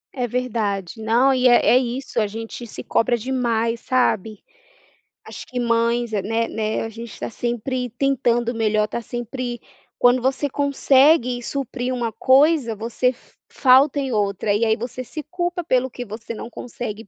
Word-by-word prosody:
É 250 -2 -1
verdade, 220 -5 -2
não, 240 +5 +3
e 255 -1 +3
é 240 - +6
é 245 - +6
isso: 255 +1 -3
a 210 - +1
gente 225 +3 -7
se - - -8
cobra 240 +1 +1
demais, 235 -2 -1
sabe. 220 -5 0 0.8
Acho - - -9
que 250 -1 -5
mães, 235 0 +1
né 225 +3 0
né, 215 -1 -2
a 225 - -4
gente 230 0 -9
está - - -5
sempre 240 +1 -3
tentando 240 -2 +1
o - - -10
melhor, 215 -1 +1
está 235 - -4
sempre 240 0 -5 0.4
quando 245 +1 +5
você 265 +3 0
consegue 270 -2 +3
suprir 255 -1 -3
uma 235 -3 -2
coisa, 265 +1 +3
você 230 +4 -1
f 250 - -11 0.2
falta 270 +2 +4
em 270 -2 -2
outra 205 -1 0
e 210 +3 +2
aí 220 0 +3
você 245 +3 -6
se 305 +6 -7
culpa 350 0 -2
pelo 260 -4 +1
que 245 - -6
você 225 +1 -7
não 230 - -7
consegue 225 -3 -7
240 Hz, 170 wpm, -22 LUFS, 225-255 Hz, 0.8 s, é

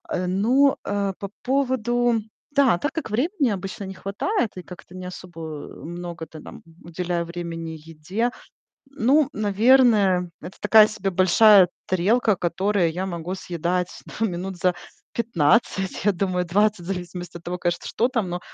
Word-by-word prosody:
Э, 180 0 -1
ну, 245 +9 +3
э, 200 -1 -1
по 200 - -5
поводу 245 -3 +1 0.3
Да, 265 -10 +4
так 290 - -2
как 320 -8 -4
времени 275 - +1
обычно 195 +2 -6
не 190 - -6
хватает 205 - -2
и 180 - -6
как-то 180 +1 -12
не 185 0 -7
особо, 180 -2 -9
э, 155 -2 -8
много-то 170 -2 -7
там - - -12 0.2
уделяю 170 0 -2
времени 165 -1 -6
еде. 185 +10 -2 0.5
Ну, 275 +2 +2
наверное, 210 -4 +4
это 175 +4 -10
такая 215 +1 +7
себе 200 -3 -3
большая 190 +1 +6 0.2
тарелка, 205 +4 +2
которая 180 +1 +1
я 180 +4 -3
могу 170 -1 -5
съедать 180 0 -2 0.2
да, 225 - -2
минут 185 -1 -4
за 180 0 +2 0.4
15, 195 -2 +1
я 205 - +5
думаю, 180 -1 -1
20, 205 +3 +2
в - - -11
зависимости 180 -2 -5
от 170 - -17
того, 180 +1 -4
конечно, 175 -1 -2
что 240 +3 +1
там, 225 -7 -1
но 175 0 -3
190 Hz, 155 wpm, -23 LUFS, 175-225 Hz, 0.5 s, такая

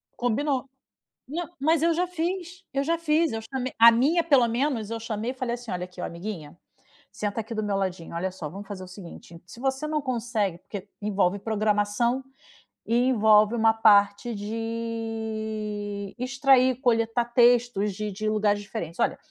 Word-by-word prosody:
Combino, 265 +2 -1 0.6
mai 330 +6 -4
mais 315 +2 +2
eu 335 0 +3
já 360 +2 +1
fiz! 355 +1 -4
Eu 275 0 0
já 335 +2 +1
fiz, 320 -1 +2
eu 225 - -3
chamei 260 +1 -4
A 230 +1 +10
minha 290 +9 +3
pelo 275 -7 +5
menos 235 -2 -1
eu 230 - -4
chamei 225 +1 -3
e - - -5
falei 250 -2 -2
assim: 240 -2 -8
"Olha 180 0 -3
aqui, 180 0 -11
ó, - - -3
amiguinha, 170 -3 -6 0.6
senta 210 +1 -3
aqui 220 +2 -6
do 215 - -2
meu 205 -1 -1
ladinho, 185 -4 -3
olha 185 +3 -1
só 165 -5 -6
vamos 195 +6 -9
fazer 190 -2 -6
o - - -12
seguinte, 175 -2 -11
se 230 - -12
você 270 +3 -1
não 305 -1 -1
consegue" 230 -8 -1
porque 200 -1 -6
envolve 200 -2 +1
programação 215 +4 0 0.6
e 230 - +1
envolve 215 -1 +5
uma 225 -1 +4
parte 205 +1 +4
de 220 -2 -4
extrair, 260 0 +3
coletar 230 -1 +2
textos 240 -4 +3
de 210 +2 -4
de - - -8
de - - +2
lugares 210 -1 +1
diferentes, 175 -5 -6
"olha, - - +1
225 Hz, 175 wpm, -26 LUFS, 205-255 Hz, 0.6 s, A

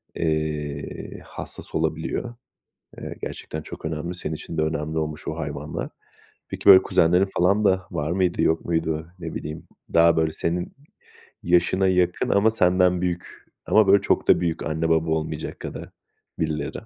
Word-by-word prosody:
eee, 75 -3 -3
hassas - - -9
olabiliyor. 80 +9 -2 0.7
Eee, - - -7
gerçekten 80 0 -6
çok - - -10
önemli, 80 +3 -3
senin 80 -3 -4
için 80 +1 -7
de - - +3
önemli 80 0 -2
olmuş 75 -1 -4
o 80 - -3
hayvanlar. 75 -1 -4 0.6
Peki, - - -7
böyle, 95 -1 +11
kuzenlerin 90 +4 +3
falan 100 +4 +3
da 95 -2 +2
var 75 +2 -2
mıydı, 90 -1 +1
yok 80 - +1
muydu? 80 -1 -1
Ne - - -6
bileyim, 75 +1 -6 0.3
daha, 85 0 +5
böyle, 80 -1 +2
senin 85 +3 -2 0.7
yaşına 90 +2 +3
yakın 90 -1 +1
ama 100 +3 +4
senden 90 -3 +3
büyük 90 -1 -4 0.2
ama 110 -2 +4
böyle 100 0 +6
çok - - +1
da - - +6
büyük 85 -2 -1
anne 80 +1 -1
baba 80 0 +2
olmayacak 80 -1 -3
kadar - - -7 0.5
birileri. 75 -2 -1
80 Hz, 155 wpm, -24 LUFS, 80-90 Hz, 0.7 s, böyle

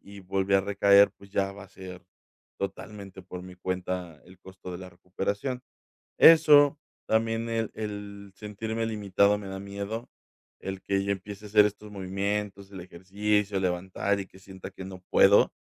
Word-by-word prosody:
y 100 0 -12
volví 95 +1 0
a 95 - +6
recaer, 100 0 +5
pues, 100 0 -16
ya 100 -1 0
va 100 0 -11
a 95 - -17
ser 95 -2 -10 0.6
totalmente 100 0 -6
por 90 0 -8
mi 90 0 -11
cuenta 90 -3 -4
el 90 0 -17
costo 95 -1 -10
de 90 - -6
la 95 0 -9
recuperación. 100 +8 -3 0.6
Eso, 150 -3 +7 0.3
también, 115 +1 +1
el 115 -1 -1
el 100 -2 -7
sentirme 110 +2 -4
limitado 105 -2 +2
me 100 -1 -8
da 95 0 -5
miedo, 100 +4 -5 0.5
el 95 -1 -5
que 100 0 0
yo 100 - +1
empiece 100 +2 -7
a - - -9
hacer 105 0 +6
estos 105 +1 -7
movimientos, 100 +1 -3
el 95 - -7
ejercicio, 100 +3 -1
levantar, 95 +2 -1
y 95 - -6
que 95 - -18
sienta 95 0 -10
que 95 0 -9
no 95 -1 -9
puedo. 100 +1 +6
100 Hz, 170 wpm, -27 LUFS, 95-105 Hz, 0.6 s, Eso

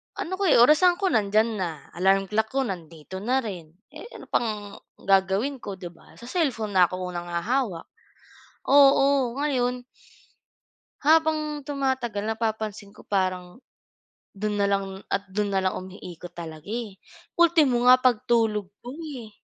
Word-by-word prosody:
Ano 375 +3 -4
ko 395 - +1
eh, 310 - +5
orasan 330 +7 +5
ko 380 0 -1
nandiyan 215 0 +1
na, 180 -3 -1 0.2
alarm 195 +2 +1
clock 220 +1 +1
ko 270 - +2
nandito 170 - -7
na 255 +6 0
rin, 175 -7 -8 0.2
eh, - - -10
ano - - -12
pang 210 -3 -2 0.3
gagawin 195 +8 +2
ko 200 -4 -7
'di 180 -2 -8
ba 170 - -20
sa 235 +2 -11
cellphone 260 - -1
na 180 -1 +6
ako 185 - -8 0.2
unang 175 0 -5
hahawak. 185 +2 -1 0.8
Oo, 275 -2 +4
ngayon 250 -4 -1 1.2
habang 305 -1 +2
tumatagal 260 -7 -2
napapansin 220 -2 -3
ko - - -15
parang 185 0 -2 0.7
dun 210 +1 -3
na 200 - +3
lang 195 -1 -2
at 200 0 -1
dun 205 0 -1
na 195 - +2
lang 185 - 0
umiikot 180 -2 -9
talaga, 160 -1 -9
eh, 220 -2 -5 0.4
ultimo 310 -8 +4
nga 255 0 +8
pagtulog 225 -4 +1 0.2
ko 245 - -8
eh. 265 -9 -7
215 Hz, 150 wpm, -25 LUFS, 190-265 Hz, 1.2 s, nga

